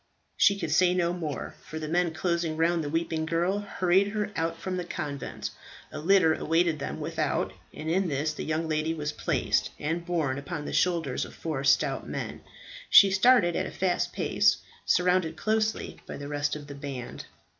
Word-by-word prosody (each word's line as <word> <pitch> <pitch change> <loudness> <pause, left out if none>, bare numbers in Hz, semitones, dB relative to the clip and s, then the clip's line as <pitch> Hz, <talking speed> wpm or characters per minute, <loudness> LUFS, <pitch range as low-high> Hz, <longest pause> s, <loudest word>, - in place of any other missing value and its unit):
She 200 - +4
could 170 -6 -3
say 180 +3 +4
no 175 -1 +1
more, 160 -5 -4
for 160 - -7
the 155 -1 -4
men 175 +1 +1
closing 170 -1 -1
round 165 0 +2
the 145 - -3
weeping 165 0 -1
girl, 175 +4 +1
hurried 195 -1 +2
her 210 -1 -2
out 165 0 -1
from 185 -1 -3
the 180 - -2
convent. 145 -4 -5 0.4
A - - -6
litter 175 -1 +4
awaited 165 -1 +1
them - - -4
without, - - -1 0.2
and 155 - -8
in 185 +3 +1
this 150 +1 -1
the - - -5
young 160 +1 -1
lady 155 +1 0
was 150 -1 -3
placed, - - 0
and, 165 +3 -2
borne 160 -6 -1
upon 145 +1 -5
the - - -5
shoulders 165 -8 +1
of - - -9
four 155 -5 -3
stout 135 - +2
men, - - -5 0.5
she 195 - +8
started 190 -3 +5
at - - -1
a - - -7
fast 185 -1 0
pace, - - +2 0.3
surrounded 180 -2 +2
closely 220 +3 -1
by - - -6
the 140 - -7
rest 145 0 -1
of 150 -1 -8
the 145 - -8
band. 140 -3 -7
165 Hz, 190 wpm, -28 LUFS, 150-180 Hz, 0.5 s, she